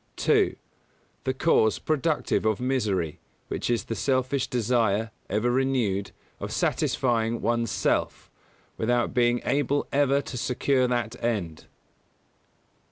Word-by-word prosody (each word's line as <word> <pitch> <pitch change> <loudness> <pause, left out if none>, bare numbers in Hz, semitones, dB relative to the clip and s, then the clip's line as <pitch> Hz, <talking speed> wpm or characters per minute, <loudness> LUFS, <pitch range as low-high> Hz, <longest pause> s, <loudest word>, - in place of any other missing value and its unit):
2. - - +2 0.7
The 130 - +1
cause 130 -7 +3
productive 155 0 0
of 110 -2 +1
misery, 100 - -1 0.3
which - - -3
is 115 -4 +1
the - - -4
selfish 130 +2 0
desire, 115 -2 +1 0.2
ever 110 +4 +1
renewed, 120 -7 0 0.3
of - - -5
satisfying 115 -2 0
one's 115 -1 0
self, - - -1 0.5
without 120 +1 +1
being 120 0 +2
able 145 +1 +1
ever 140 0 +3
to 135 -2 -6
secure 130 +1 +1
that 120 -3 -2
end. 100 -9 -2
120 Hz, 115 wpm, -26 LUFS, 110-130 Hz, 0.7 s, cause